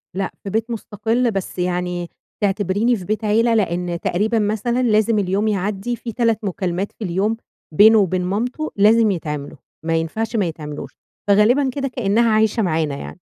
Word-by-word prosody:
لأ، 195 -1 -2
في 200 - -5
بيت 225 +3 -1
مستقل، 230 +2 -1
بس 195 -2 -4
يعني 180 -1 -2 0.3
تعتبريني 205 +4 +1
في 185 - -7
بيت 215 +3 -2
عيلة 230 +2 +3
لإن 175 -4 0
تقريبًا 220 +5 +1
مثلًا 220 +4 0
لازم 215 -1 +3
اليوم 200 +2 0
يعدّي 205 +3 -1
في 235 - -7
3 230 -2 +1
مكالمات 185 0 -2
في 220 - -9
اليوم 200 +5 0 0.4
بينه 220 +6 +7
وبين 185 -2 +1
مامته، 245 +11 -2
لازم 215 +2 +5
يتعملوا، 150 -5 -4 0.3
ما 165 0 +1
ينفعش 220 +8 -2
ما 205 -4 +2
يتعملوش، 150 -2 -6 0.4
فغالبًا 225 +7 +4
كده 275 +1 -2
كأنها 230 -2 +1
عايشة 220 +1 +2
معانا 155 -5 0
يعني. 75 - -8
205 Hz, 160 wpm, -20 LUFS, 180-225 Hz, 0.4 s, بينه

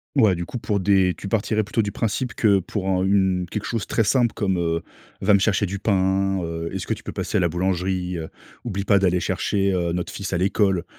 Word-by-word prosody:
Ouais, 110 -8 +5
du 85 -1 -3
coup - - -5
pour 105 -3 -1
des 95 -1 +3
tu 100 - -7
partirais 110 +1 0
plutôt 105 +2 0
du 100 - -3
principe 115 +3 -2
que 100 -2 +3
pour 95 +1 -3
un 95 -1 +1
une 95 -2 +2
quelque 105 -1 -3
chose 115 -5 -2
très 115 - +1
simple 120 +1 +2
comme: 95 -3 0
«Heu, 85 -1 0 0.4
va 100 +1 +5
me - - +4
chercher 100 0 +1
du 100 +2 -4
pain, 95 -1 +1
heu. 85 0 -4
Est-ce 95 -2 -4
que - - 0
tu - - -14
peux - - -5
passer - - -2
à - - +3
la 85 - +2
boulangerie, 90 +1 -1
heu? 80 -1 -6 0.3
Oublie 100 -5 -3
pas 100 +1 +4
d'aller 90 -2 +2
chercher, 100 +2 0
heu, 85 -2 0
notre 90 0 -3
fils 95 -2 -5
à - - +1
l'école». 95 -1 +1
95 Hz, 240 wpm, -23 LUFS, 90-100 Hz, 0.4 s, Ouais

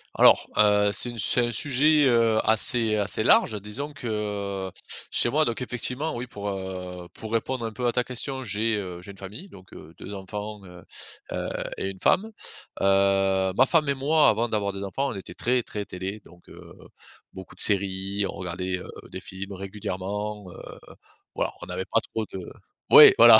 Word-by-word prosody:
Alors, - - +5
heu, 105 -1 +4
c'est 105 +5 +4
une 120 - -8
c'est 120 +3 +2
un - - -3
sujet, 145 +5 +3
heu, 115 -3 +3
assez 110 0 +5
assez 105 +1 0
large. 110 -1 +4
Disons 135 +9 -5
que 105 -5 -4 0.4
chez - - +3
moi 155 +4 +2
donc 120 +1 -2
effectivement 125 +5 -1
oui 125 +1 -5
pour, 100 -4 -6
heu, 90 -2 -6
pour 110 0 -9
répondre 115 +2 -1
un 110 - -4
peu 125 +2 -2
à 120 - +1
ta 125 0 +2
question 130 +2 -4
j'ai, 110 0 0
heu, 90 -4 -5
j'ai 100 +2 -10
une 100 - -15
famille. 100 - -10
Donc, 95 -1 -16
heu, 80 - -12
2 100 - -8
enfants, 105 +2 -7
heu 90 -1 -13 0.5
heu, - - -3 0.3
et 95 - -2
une 95 -1 -9
femme. 220 +4 +2 0.5
Heu, 95 -1 +2
ma 130 - +5
femme 155 +1 +2
et 140 - +2
moi 150 +3 +3
avant 115 +2 0
d'avoir 100 -2 -1
des 100 0 -6
enfants 135 +8 -2
on - - -6
était 95 - -8
très, 125 0 0
très 105 -1 -5
télé 95 +3 -6
donc, 85 0 -18
heu, - - -13 0.6
beaucoup 95 -1 -11
de - - +3
séries, 100 0 +2
on - - -6
regardait, 90 0 -4
heu, - - -10 0.2
des - - -7
films 95 +1 -7
régulièrement, 100 +1 -5
heu, - - -12 0.8
voilà - - -1
on - - -8
n'avait - - -4
pas - - +2
trop 110 -1 -2
de 95 - -4 0.5
Ouais - - +10
voilà 115 -1 +9
105 Hz, 190 wpm, -25 LUFS, 95-120 Hz, 0.8 s, Ouais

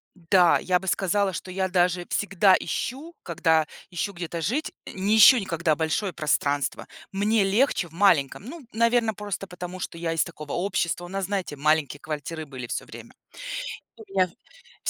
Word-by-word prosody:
Да, 180 0 +4
я 180 0 +1
бы 190 - -10
сказала, 190 +2 +1
что 185 - -6
я 190 +1 -1
даже 180 -1 +1
всегда 195 -1 +3
ищу, 295 +7 -4
когда 160 -2 +2 0.2
ищу 180 +3 -3
где-то 170 -2 -5
жить, 250 - -1 0.2
э, - - -7
не 200 +3 +1
ищу 235 +4 +9
никогда 170 -5 0
большое 165 +5 -1
пространство. 145 -3 0 0.3
Мне 205 +2 +2
легче 200 -2 +2
в - - -23
маленьком, 170 -3 +2
ну, 280 +1 -9
наверно, 230 0 +2
просто 205 -1 -5
потому, 180 0 -8
что 175 - -5
я 165 -1 -2
из 165 -2 +2
такого 155 -4 -8
общества. 175 -1 -1
У - - -11
нас, 195 0 -3
знаете, 195 -7 -3
маленькие 145 -1 +1
квартиры 155 +1 -5
были 130 -3 -8
всё - - -4
время. - - -12 0.8
И 225 - -12
у - - -12
меня 185 -1 +3 0.6
в - - +1
180 Hz, 175 wpm, -25 LUFS, 165-200 Hz, 0.8 s, ищу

